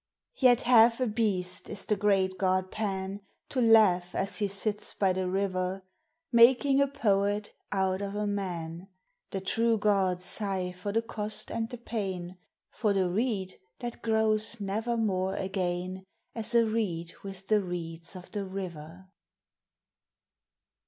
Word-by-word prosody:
Yet 245 -3 +5
half 235 -1 +6
a 255 - +2
beast 210 -5 -1
is 205 -2 -4
the 210 - +1
great 195 -2 +1
god 185 -1 +1
Pan, 195 -2 -3 0.3
To 260 - 0
laugh, 205 -6 +5
as 195 +3 0
he 205 - +1
sits 205 +1 -1
by 190 -2 +2
the 185 0 -1
river, 190 0 -1 0.5
Making 260 +4 +6
a 280 - +4
poet 205 -6 0 0.2
out 190 -1 0
of 200 0 -4
a 210 0 -1
man. 180 -4 -4 0.4
The 195 - -4
true 225 +4 +2
gods 190 -4 +1
sigh 190 -2 -2
for 180 +3 -5
the 225 +2 +1
cost 215 -1 -5
and 225 0 -2
the 245 - -6
pain, 190 -6 -4 0.2
— - - -64
For 210 -4 +2
the 185 -2 +1
reed 200 -3 -1 0.2
that 240 -1 -6
grows 220 0 +1
nevermore 205 -2 -1
again 185 -1 -2 0.3
As 225 +1 0
a 230 -1 +6
reed 190 -7 -2
with 195 -1 -8
the 215 -1 +3
reeds 170 -1 -4
of 180 -1 -10
the 205 -3 -3
river. 180 -2 -7
195 Hz, 145 wpm, -29 LUFS, 185-220 Hz, 0.5 s, half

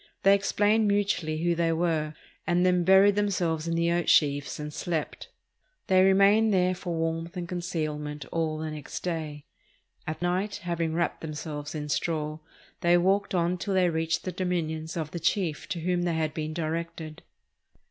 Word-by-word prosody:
They 195 - +7
explained 205 +2 +2
mutually 185 -6 0
who 175 0 +3
they 165 0 +1
were, 160 -2 0 0.3
and 175 0 +3
then 180 -1 +3
buried 190 +2 +6
themselves 175 -6 0
in 165 - 0
the 170 0 +2
oat 175 0 +1
sheaves 140 -3 +2
and 150 0 -5
slept. 165 -2 -3 0.6
They 185 -1 +4
remained 200 +3 +5
there 185 -1 +3
for 175 -1 -4
warmth 165 +1 -2
and 175 -1 -4
concealment 155 -5 -4
all 160 -2 -1
the 155 0 -4
next 150 -2 -7
day. 155 -4 -4 0.6
At 155 - -3
night, 180 +4 -1
having 170 -2 -1
wrapped 170 0 -1
themselves 150 -1 -6
in 150 -1 -4
straw, 155 0 -2 0.4
they 175 0 +4
walked 195 +2 +1
on 175 +1 +1
till 195 +2 -2
they 180 -2 +3
reached 160 0 -1
the 185 - -3
dominions 165 -3 -2
of 155 -2 -3
the 170 - -4
chief 165 -2 -1
to 170 - -3
whom 180 +1 0
they 175 -2 0
had 155 -2 -1
been 155 0 -4
directed. 165 -1 -4
170 Hz, 170 wpm, -27 LUFS, 155-180 Hz, 0.6 s, They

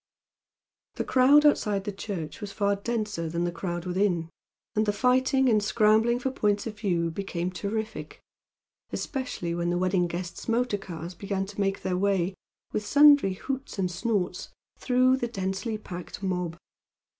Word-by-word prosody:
The - - -1
crowd 275 +4 +5
outside 210 -9 +3
the 205 - -3
church 190 -4 -6
was 205 -1 -5
far 200 -1 +1
denser 210 -5 -2
than 170 +2 -1
the 175 - 0
crowd 175 0 -4
within, 180 -3 0 0.4
and 215 0 +2
the - - +4
fighting 260 +3 +3
and 215 -3 +4
scrambling 220 +2 +3
for 260 +2 -2
points 205 -5 0
of 215 -2 -6
view 170 -5 0
became 180 -1 -3
terrific, 215 +5 -4 0.7
especially 255 - -3
when 170 0 -1
the 175 - +1
wedding 185 -1 +2
guests' 175 +5 -6
motor 230 -2 +1
cars 170 -2 -7
began 195 +1 -3
to 205 +1 -5
make 195 0 -1
their 185 -1 0
way, 195 -1 +1 0.4
with 210 - -1
sundry 285 -3 +6
hoots 270 +7 -5
and 185 -2 0
snorts, 185 -2 -2 0.3
through 255 +1 +3
the 240 - -2
densely 195 +1 -3
packed 180 -1 -8
mob. 180 -3 -2
200 Hz, 155 wpm, -27 LUFS, 180-230 Hz, 0.7 s, sundry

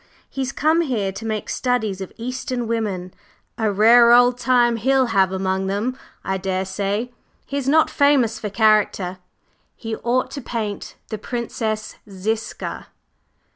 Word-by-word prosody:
"He's 265 -1 -3
come 315 +4 +2
here 225 -11 -1
to 215 +4 -7
make 215 -1 -3
studies 220 -7 -1
of 190 - -6
Eastern 250 0 -3
women. 200 -6 -2 0.5
A 220 -2 +1
rare 235 +4 +6
old 245 0 +5
time 240 -1 +3
he'll 265 +3 +3
have 190 -1 +3
among 190 0 -1
them, 210 +6 -1 0.3
I 190 0 -1
daresay! 195 +4 -2 0.3
He's 275 -1 -2
not 315 +2 +4
famous 275 -6 +3
for 210 - -4
character. 205 -3 +2 0.6
He 225 -1 -5
ought 250 +2 0
to 280 - -6
paint 215 -5 -5
the 215 - -4
Princess 220 -2 -4
Ziska." 215 +4 -4
225 Hz, 135 wpm, -21 LUFS, 195-250 Hz, 0.6 s, rare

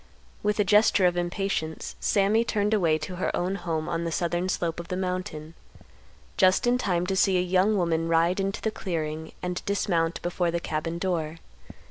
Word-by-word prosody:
With 210 0 0
a - - +5
gesture 205 -1 +4
of 175 -1 +3
impatience, 175 -2 -2
Sammy 205 +3 +2
turned 210 -2 0
away 170 -7 +3
to 180 +3 -6
her 185 - 0
own 180 +2 -1
home 165 -4 -3
on 165 0 -2
the 165 - -2
southern 175 +2 -1
slope 170 -2 -1
of 170 - -7
the 180 - -3
mountain, 180 -4 -4 0.8
just 185 +5 +4
in 245 +1 +3
time 180 -6 0
to 190 +1 -1
see 190 0 +3
a - - +3
young 185 +4 +2
woman 165 -2 0
ride 165 +3 +2
into 195 +1 -2
the 220 - 0
clearing 160 -5 -4
and 180 0 -3
dismount 170 -5 0
before 175 0 0
the 170 0 -1
cabin 165 +1 -3
door. 165 -3 -2
180 Hz, 185 wpm, -26 LUFS, 165-195 Hz, 0.8 s, a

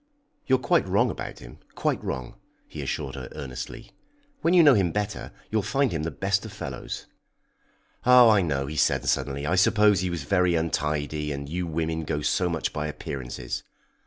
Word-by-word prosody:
"You 130 - +5
are - - 0
quite - - +2
wrong - - +2
about - - -6
him - - -12 0.2
quite - - -1
wrong," 65 -2 -4 0.3
he - - -7
assured 70 -3 -3
her 65 -2 -7
earnestly. 65 -2 -7 0.5
"When 170 +2 +3
you 175 - +8
know 145 -3 +8
him 95 -7 +2
better, 105 +1 -3 0.2
you'll 110 0 +2
find 135 +5 +1
him 80 - -2
the 80 - -2
best 95 +3 0
of 110 - -8
fellows. 75 -11 -6 1.0
Oh, 125 -1 +8
I 105 -3 +5
know," 70 -6 -1
he 75 +3 -6
said - - +2
suddenly, 70 +1 0
"I 85 - 0
suppose 105 +1 +4
he 90 0 -1
was 85 -4 -3
very 90 +1 +2
untidy, 75 -2 -1
and 70 0 -5
you 90 +3 -3
women 80 0 -2
go 75 0 -2
so 90 +3 +1
much 85 -2 -2
by 75 0 -2
appearances!" 65 -4 -5
80 Hz, 190 wpm, -26 LUFS, 70-100 Hz, 1.0 s, you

